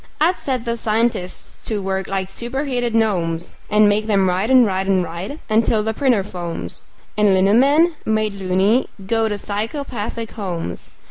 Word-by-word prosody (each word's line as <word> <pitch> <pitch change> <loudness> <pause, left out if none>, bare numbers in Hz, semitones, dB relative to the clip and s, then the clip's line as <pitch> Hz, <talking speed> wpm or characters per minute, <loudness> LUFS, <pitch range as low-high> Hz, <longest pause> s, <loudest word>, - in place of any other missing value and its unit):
I'd 340 +4 +3
set 255 -3 -3
the 235 0 -1
scientists 220 -4 -2
to 215 -2 -1
work 190 -1 -2
like 190 -1 -3
superheated 245 +1 -2
gnomes, 175 -7 0
And 210 0 +5
make 210 +1 +1
them 195 -3 +3
write 185 +5 0
and 255 -2 +7
write 190 -1 -1
and 190 -2 +3
write 175 - -6
until 220 0 +2
the 220 +1 -1
printer 245 -5 +2
foams 170 - -6 0.3
And 210 -2 +4
lino 190 +2 +3
men, 290 +8 +4
made 215 -1 0
"loony", 195 +5 +1 0.2
go 225 +2 +1
to 205 - -2
psychopathic 225 +1 -4
homes. 175 - -5
215 Hz, 160 wpm, -20 LUFS, 190-235 Hz, 0.3 s, and